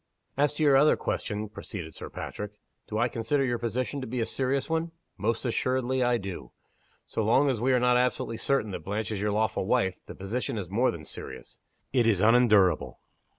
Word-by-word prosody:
"As 145 Hz, +1 st, +2 dB
to 155 Hz, -, 0 dB
your 145 Hz, -2 st, +6 dB
other 150 Hz, +3 st, +5 dB
question," 105 Hz, +1 st, -3 dB
proceeded 90 Hz, -5 st, -8 dB
Sir -, -, -8 dB
Patrick. 105 Hz, 0 st, -6 dB, 0.3 s
"Do 110 Hz, -, -3 dB
I 120 Hz, +2 st, +3 dB
consider 120 Hz, +4 st, 0 dB
your 120 Hz, -2 st, -1 dB
position 130 Hz, +4 st, -2 dB
to 130 Hz, -, -5 dB
be 125 Hz, +2 st, -3 dB
a 115 Hz, -, +1 dB
serious 135 Hz, +2 st, -1 dB
one? 165 Hz, +1 st, -1 dB, 0.2 s
Most 110 Hz, +5 st, -1 dB
assuredly, 130 Hz, +1 st, 0 dB
I 120 Hz, -1 st, +3 dB
do! 95 Hz, -, -7 dB, 0.5 s
So 110 Hz, -, -2 dB
long 135 Hz, +6 st, +4 dB
as 115 Hz, -4 st, -3 dB
we 130 Hz, +2 st, +2 dB
are 125 Hz, -, +4 dB
not 125 Hz, 0 st, +4 dB
absolutely 125 Hz, -2 st, 0 dB
certain 125 Hz, -6 st, +1 dB
that 95 Hz, -, -4 dB
Blanche 105 Hz, +4 st, -3 dB
is 100 Hz, -2 st, -3 dB
your 105 Hz, 0 st, +1 dB
lawful 105 Hz, -2 st, 0 dB
wife, 100 Hz, -7 st, +1 dB
the -, -, -8 dB
position 110 Hz, +4 st, -3 dB
is 95 Hz, -4 st, -5 dB
more 120 Hz, +6 st, +3 dB
than 80 Hz, -2 st, -6 dB
serious: -, -, -9 dB, 0.3 s
it 120 Hz, -4 st, +3 dB
is 105 Hz, -5 st, +3 dB
unendurable. 110 Hz, -4 st, +4 dB
115 Hz, 200 wpm, -28 LUFS, 105-130 Hz, 0.5 s, your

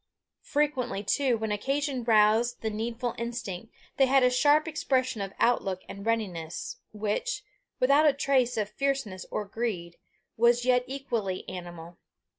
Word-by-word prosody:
Frequently, 260 Hz, -8 st, 0 dB
too, 255 Hz, +3 st, +2 dB
when 220 Hz, -1 st, -3 dB
occasion 270 Hz, +4 st, -1 dB
roused 225 Hz, +1 st, +3 dB
the 220 Hz, -, -2 dB
needful 230 Hz, +3 st, -3 dB
instinct, 230 Hz, -4 st, -5 dB, 0.3 s
they 270 Hz, -, +5 dB
had 270 Hz, 0 st, +4 dB
a 250 Hz, -, +5 dB
sharp 290 Hz, +5 st, +4 dB
expression 260 Hz, -7 st, 0 dB
of 195 Hz, -1 st, -4 dB
outlook 195 Hz, -6 st, +1 dB
and 200 Hz, -, -8 dB
readiness, 215 Hz, +1 st, -2 dB
which, 215 Hz, -, -2 dB, 0.4 s
without 280 Hz, +4 st, +5 dB
a 295 Hz, -, +5 dB
trace 265 Hz, -3 st, +1 dB
of 210 Hz, -2 st, 0 dB
fierceness 265 Hz, -8 st, -2 dB
or 210 Hz, -, -3 dB
greed, 200 Hz, -6 st, -4 dB, 0.4 s
was 240 Hz, +1 st, +4 dB
yet 250 Hz, -1 st, +4 dB
equally 235 Hz, -8 st, -3 dB
animal. 175 Hz, -1 st, -8 dB
235 Hz, 140 wpm, -28 LUFS, 205-270 Hz, 0.4 s, they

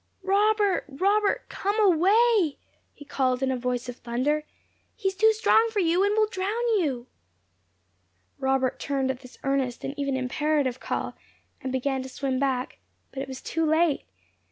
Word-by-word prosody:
"Robert! 410 Hz, +1 st, +2 dB
Robert! 400 Hz, +8 st, +1 dB
COME 405 Hz, +2 st, -2 dB
AWAY!" 400 Hz, -1 st, +4 dB, 0.3 s
he 290 Hz, -, -14 dB
called 260 Hz, -2 st, 0 dB
in 265 Hz, -, +1 dB
a -, -, 0 dB
voice 250 Hz, 0 st, -2 dB
of 245 Hz, 0 st, -6 dB
thunder; 265 Hz, +6 st, -1 dB, 0.5 s
"he 385 Hz, -, 0 dB
is -, -, -7 dB
too 440 Hz, +3 st, +5 dB
strong 445 Hz, +1 st, +3 dB
for 440 Hz, -, -6 dB
you, 355 Hz, 0 st, +3 dB
and 405 Hz, +1 st, +2 dB
will 435 Hz, -, +5 dB
drown 425 Hz, +4 st, -2 dB
you!" 265 Hz, -8 st, -1 dB, 1.3 s
Robert 265 Hz, -1 st, 0 dB
turned 270 Hz, -2 st, -1 dB
at 255 Hz, -, -7 dB
this 255 Hz, -1 st, -15 dB
earnest 270 Hz, -3 st, -1 dB
and 275 Hz, -, -3 dB
even 275 Hz, -2 st, 0 dB
imperative 265 Hz, 0 st, 0 dB
call, -, -, -3 dB, 0.5 s
and 260 Hz, -, -4 dB
began 265 Hz, +1 st, -1 dB
to 260 Hz, -, -7 dB
swim 260 Hz, 0 st, -2 dB
back; 265 Hz, -2 st, -1 dB, 0.3 s
but 270 Hz, -, -5 dB
it 270 Hz, -, -5 dB
was 265 Hz, -1 st, -8 dB
too 325 Hz, -, -1 dB
late. 315 Hz, -1 st, +2 dB
285 Hz, 165 wpm, -26 LUFS, 260-390 Hz, 1.3 s, too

